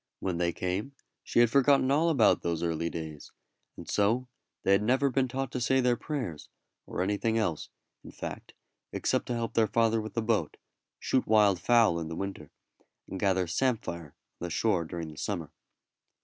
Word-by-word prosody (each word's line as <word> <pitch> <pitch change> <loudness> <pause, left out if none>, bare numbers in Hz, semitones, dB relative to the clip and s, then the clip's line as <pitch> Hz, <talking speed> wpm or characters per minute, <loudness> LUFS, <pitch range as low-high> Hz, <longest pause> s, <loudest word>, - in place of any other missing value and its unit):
When 90 -3 -2
they 85 -1 +1
came 95 +10 -3 0.3
she 120 - +2
had 120 -2 +4
forgotten 140 0 +4
all 160 +4 +3
about 135 -9 +4
those 85 -1 -2
early 85 0 -1
days; 80 -3 -7 0.5
and - - -9
so 115 +5 +1 0.4
they - - +2
had 100 +1 +5
never 130 +5 +2
been 130 +1 +1
taught 135 +1 -3
to 125 - -3
say 130 +3 +3
their 125 -1 +3
prayers, 120 - -5 0.4
or - - -2
anything 105 +3 0
else, 90 -9 -1 0.3
in - - -10
fact, - - -8 0.4
except - - -1
to 120 - -1
help 115 -1 -3
their 115 -1 +3
father 115 0 +2
with 110 -1 -8
the 115 - 0
boat, 110 -9 0 0.4
shoot 130 - 0
wild 105 -4 +4
fowl 115 -3 +4
in 80 - -4
the 80 - -5
winter, 95 -6 -5 0.6
and 95 - -6
gather 95 -2 +2
samphire 85 - -2
on 80 +1 -11
the - - -4
shore 85 -1 +1
during 80 -1 -6
the 75 - -11
summer. 85 -8 -3
105 Hz, 185 wpm, -29 LUFS, 85-120 Hz, 0.6 s, had